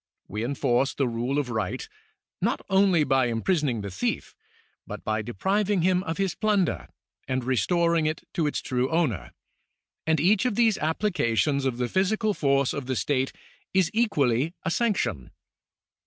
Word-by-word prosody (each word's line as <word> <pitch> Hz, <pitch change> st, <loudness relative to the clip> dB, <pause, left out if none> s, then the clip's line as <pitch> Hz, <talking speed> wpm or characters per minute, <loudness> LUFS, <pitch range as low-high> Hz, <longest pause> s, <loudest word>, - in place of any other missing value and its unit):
We 105 Hz, +1 st, -4 dB
enforce 130 Hz, 0 st, +1 dB
the 135 Hz, -, +1 dB
rule 120 Hz, +4 st, -1 dB
of 140 Hz, -4 st, -1 dB
right, 110 Hz, -5 st, -2 dB, 0.5 s
not -, -, 0 dB
only 190 Hz, -4 st, +4 dB
by 135 Hz, -3 st, +2 dB
imprisoning 125 Hz, -, 0 dB
the 100 Hz, -1 st, -5 dB
thief, 90 Hz, -, -2 dB, 0.5 s
but -, -, -7 dB
by 110 Hz, 0 st, -1 dB
depriving 190 Hz, -, 0 dB
him 185 Hz, 0 st, +3 dB
of 160 Hz, -, -3 dB
his 195 Hz, -3 st, 0 dB
plunder, 210 Hz, -5 st, 0 dB, 0.4 s
and 130 Hz, -1 st, -1 dB
restoring 170 Hz, +6 st, +2 dB
it 155 Hz, -, -3 dB
to 160 Hz, -3 st, +1 dB
its 145 Hz, -, -2 dB
true 130 Hz, -1 st, 0 dB
owner; 160 Hz, -, 0 dB, 0.8 s
and 160 Hz, -1 st, +3 dB
each 190 Hz, -, +3 dB
of 220 Hz, -, -1 dB
these 225 Hz, -3 st, +3 dB
applications 150 Hz, -, +1 dB
of 130 Hz, -3 st, -1 dB
the 125 Hz, 0 st, 0 dB
physical 210 Hz, -, +1 dB
force 140 Hz, -5 st, +1 dB
of 140 Hz, -3 st, -5 dB
the 130 Hz, -, -1 dB
state 135 Hz, 0 st, 0 dB, 0.4 s
is 190 Hz, -3 st, +3 dB
equally 160 Hz, -, +1 dB
a 165 Hz, -, -1 dB
sanc 230 Hz, +1 st, +1 dB
tion. 80 Hz, -, -2 dB
145 Hz, 160 wpm, -26 LUFS, 125-185 Hz, 0.8 s, only